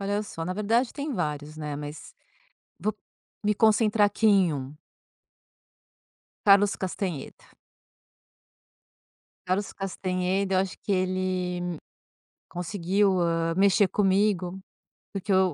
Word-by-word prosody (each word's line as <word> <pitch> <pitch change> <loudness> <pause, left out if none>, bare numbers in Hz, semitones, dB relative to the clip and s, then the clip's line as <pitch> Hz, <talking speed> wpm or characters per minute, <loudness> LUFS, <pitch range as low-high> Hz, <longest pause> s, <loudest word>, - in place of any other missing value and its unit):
Olha 205 +1 -1
só, 165 -5 -6
na 185 - -2
verdade, 230 +5 +1
tem 290 0 -3
vários, 150 - -3
né, 150 -2 -4
mas 145 +1 -8 0.7
vou 215 +5 0 0.5
me 210 - +2
concentrar 215 0 +4
aqui 210 +2 0
em 195 -5 +5
um. 140 +1 -6 1.7
Carlos 200 0 +6
Castanheda. 185 -5 -5 1.9
Carlos 195 +2 0
Castanheda, 190 0 -1
eu - - +4
acho 190 0 -2
que - - -3
ele, 185 -2 -1 0.7
conseguiu, 185 +2 0
hã, 165 -1 +1
mexer 200 +1 +5
comigo. 190 -2 +1 0.5
Porque 195 0 -4
eu 185 -2 +3
190 Hz, 110 wpm, -26 LUFS, 175-205 Hz, 1.9 s, Carlos